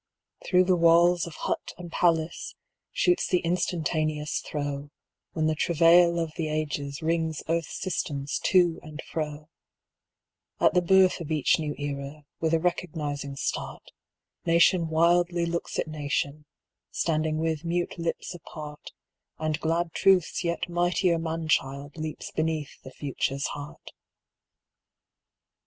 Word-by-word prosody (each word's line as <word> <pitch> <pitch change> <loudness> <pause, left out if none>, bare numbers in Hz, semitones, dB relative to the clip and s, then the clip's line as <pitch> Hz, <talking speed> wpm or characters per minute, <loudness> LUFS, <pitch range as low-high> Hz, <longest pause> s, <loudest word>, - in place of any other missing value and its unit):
Through 180 0 +4
the 185 0 +3
walls 170 +1 +5
of 170 - -9
hut - - -3
and 175 -2 -9
palace 165 -2 0 0.4
shoots 365 -8 +2
the 180 - +3
instantaneous 155 -3 -1
throe, 145 -1 -4 0.4
When 155 - 0
the 155 - +2
travail 170 +2 +5
of 165 -2 -2
the 165 -2 -1
Ages 150 0 -3
wrings 160 -1 0
earth's 165 -1 -1
systems 145 -6 -2
to 175 -3 +4
and 155 -1 -9
fro; 150 -1 -5 1.1
At - - +4
the 180 - +4
birth 185 0 +4
of 160 - -6
each 155 -1 +3
new 150 -2 -3
Era, 145 +1 -5
with 160 -1 0
a - - +2
recognizing 150 -5 -2
start, - - -4 0.5
Nation 170 +1 +4
wildly 170 +2 +3
looks 170 0 -3
at - - -1
nation, 150 -1 -3 0.4
standing 155 -1 0
with 160 -1 -1
mute 175 +1 -2
lips 170 +2 -3
apart, 150 -3 -9 0.4
And 155 0 -1
glad 165 +1 0
Truth's 190 -3 +3
yet 170 +1 -1
mightier 175 0 +1
man 165 0 -3
child 140 -1 0
leaps 155 -1 -6
beneath 155 -2 -2
the - - -10
Future's 140 0 -2
heart. 145 0 -9
160 Hz, 130 wpm, -27 LUFS, 150-170 Hz, 1.1 s, walls